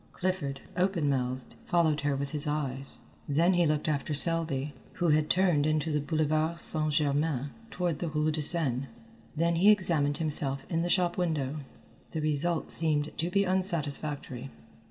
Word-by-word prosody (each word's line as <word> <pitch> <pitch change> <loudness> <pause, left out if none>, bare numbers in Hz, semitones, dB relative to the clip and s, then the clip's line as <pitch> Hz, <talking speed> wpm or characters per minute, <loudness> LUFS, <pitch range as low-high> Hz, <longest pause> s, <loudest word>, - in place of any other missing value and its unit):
Clifford, 170 -7 -3
open 180 -4 0
mouthed, 130 -2 -3
followed 160 -4 +1
her 145 -1 -1
with 140 0 -4
his 150 0 -2
eyes; 135 -3 -3 0.3
then 165 +6 +2
he 175 -2 +2
looked 150 0 -1
after 150 0 -2
Selby, 150 -3 +4 0.2
who 175 -2 -1
had 155 0 +2
turned 175 -5 +2
into 155 +1 -1
the 150 - 0
Boulevard 155 +2 -1
St. 155 -1 +4
Germain 145 -2 -1 0.2
toward 175 -4 -3
the 170 - -3
rue 155 0 -1
de 155 0 -3
Seine. 140 -5 +1 0.5
Then 165 +2 0
he 195 +5 +5
examined 165 -8 +2
himself 140 -4 0
in 165 -1 0
the 175 - -2
shop 175 -1 0
window. 155 -5 -2 0.6
The 160 - -3
result 155 +2 -2
seemed 155 -2 +2
to 165 +2 -1
be 200 +2 +1
unsatisfactory. 155 - 0
155 Hz, 160 wpm, -28 LUFS, 145-170 Hz, 0.6 s, he